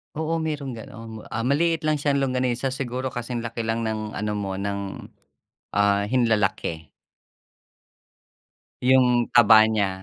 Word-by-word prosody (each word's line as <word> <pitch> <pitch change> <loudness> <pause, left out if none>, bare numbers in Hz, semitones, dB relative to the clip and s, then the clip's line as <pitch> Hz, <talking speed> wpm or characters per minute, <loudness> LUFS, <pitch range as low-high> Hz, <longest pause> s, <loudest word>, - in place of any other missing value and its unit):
Oo, 160 +2 -1
merong 150 -4 -3
gano'n, 115 -1 -9
ah, 115 +1 -3
maliit 160 +6 +1
lang 155 -1 +1
siyang 140 -1 +1
longganisa 130 0 0
siguro 130 0 -3
kasing 120 -1 -4
laki 115 0 -4
lang 115 +1 -1
ng 110 -1 -3
ano 105 +1 -2
mo, 100 -2 -3
ng, 100 0 -4 0.7
ah, 100 0 +3
hinlalaki. 105 -9 0 1.9
'Yung 125 -2 +4
taba 110 -2 +8
niya 110 -3 +1
120 Hz, 125 wpm, -24 LUFS, 105-130 Hz, 1.9 s, taba